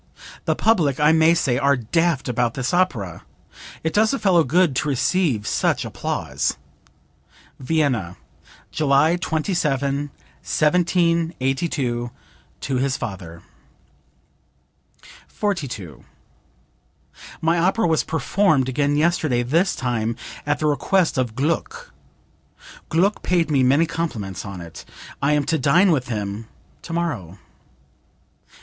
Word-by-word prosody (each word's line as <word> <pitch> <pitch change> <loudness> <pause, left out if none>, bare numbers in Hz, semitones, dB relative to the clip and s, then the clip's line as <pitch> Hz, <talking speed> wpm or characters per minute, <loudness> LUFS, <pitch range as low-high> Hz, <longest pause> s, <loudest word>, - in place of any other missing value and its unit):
The - - +1
public, 165 - +2
I 150 +1 +5
may 160 +1 +4
say, 125 -6 +1
are 140 0 +3
daft 155 +5 0
about 120 -1 0
this 130 +2 -2
opera. 125 - 0 0.6
It 160 - -1
does 215 +4 +3
a - - -2
fellow 180 -8 +3
good 170 -3 +2
to 150 - 0
receive 135 - +1
such - - 0
applause." - - -2 1.0
(Vienna, 130 - 0 0.5
July 150 +2 +3
27, 145 -5 -1 0.3
1782, 160 -6 0 0.5
to 135 - -2
his 130 +1 0
father.) 90 -5 -7 1.8
42. 125 - -4 1.4
"My 165 +1 +1
opera 190 +6 +2
was 160 -2 +2
performed 160 -4 +1
again 145 +2 0
yesterday, 155 -6 +1
this 165 +10 +1
time 120 -3 -2 0.3
at 145 - +1
the 155 - -2
request 160 +1 +1
of 120 -4 -2
Gluck. 305 - -2 1.0
Gluck 190 +6 +1
paid 170 -3 +1
me 140 -3 +3
many 140 +6 +4
compliments 130 - -4
on 95 -2 -7
it. 85 -3 -10 0.4
I 140 +2 +2
am 150 -1 +2
to 160 +2 0
dine 175 +8 +4
with 135 -5 0
him 105 -1 -4 0.3
tomorrow." 150 - -4
145 Hz, 115 wpm, -22 LUFS, 125-170 Hz, 1.8 s, I